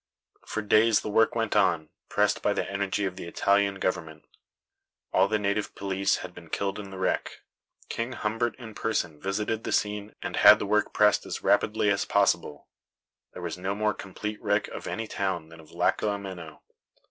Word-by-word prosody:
For 110 - -3
days 110 +1 +4
the 105 - -4
work 115 +2 +3
went 115 -2 0
on, 80 -3 +2 0.2
pressed - - +2
by - - +2
the - - -2
energy 100 +1 -1
of 95 -1 -4
the 85 - -6
Italian 100 +2 +2
government. 80 -5 -3 0.9
All 95 +1 +5
the 110 +1 +1
native 105 0 -1
police 95 0 0
had 90 - -10
been 85 -2 -13
killed 100 +4 -2
in 100 -1 -7
the 95 - -9
wreck. 95 - -1 0.5
King 115 +3 -3
Humbert 115 +1 -1
in 115 -4 -9
person 90 -9 -2
visited 105 +3 -2
the - - -3
scene 105 0 -1
and - - -3
had 105 +1 +9
the 105 - -3
work 105 +1 +1
pressed 105 0 +4
as - - -5
rapidly 105 -1 +3
as 100 - 0
possible. 85 -7 +1 0.7
There 90 - -8
was 85 +1 -4
no 95 +2 -2
more 105 0 +1
complete 105 +2 -6
wreck 105 -1 +1
of - - -7
any 115 - -3
town 95 -6 -3
than 80 0 -14
of 80 - -15
Lacco 90 +5 +1
Ameno. 95 -6 -6
100 Hz, 185 wpm, -27 LUFS, 95-105 Hz, 0.9 s, had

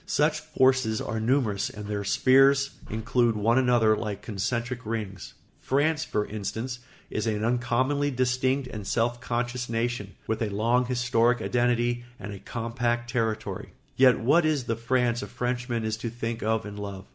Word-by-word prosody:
Such - - +2
forces 130 -4 +2
are 110 - -3
numerous 110 -4 +1
and 105 -1 -8
their 105 0 -3
spheres 135 +6 +4 0.2
include 115 +1 +1
one 115 +4 +3
another 120 -4 +4
like 105 -2 -4
concentric 120 +4 -3
rings. 105 -4 -5 0.2
France, 150 +3 +1
for 105 0 -1
instance, 110 +4 -4 0.3
is 110 +1 -2
an 110 0 0
uncommonly 130 +4 +1
distinct 130 +1 0
and 105 -4 -7
self 120 +1 0
conscious 120 +1 -2
nation, 115 -3 -2
with 110 - -2
a 110 - 0
long 115 +5 +1
historic 120 -1 +2
identity 120 0 +1 0.2
and 105 0 -6
a 100 - -8
compact 120 +1 -2
territory. 115 -3 -2 0.2
Yet 130 -3 +5
what 145 +9 +4
is 155 -4 +1
the 115 -1 -1
France 120 +1 0
a - - -5
Frenchman 120 -2 -2
is 110 0 -1
to 115 +1 -4
think 115 0 -4
of 110 0 0
and 105 0 -7
love? 100 -2 -6
120 Hz, 160 wpm, -27 LUFS, 110-125 Hz, 0.3 s, Yet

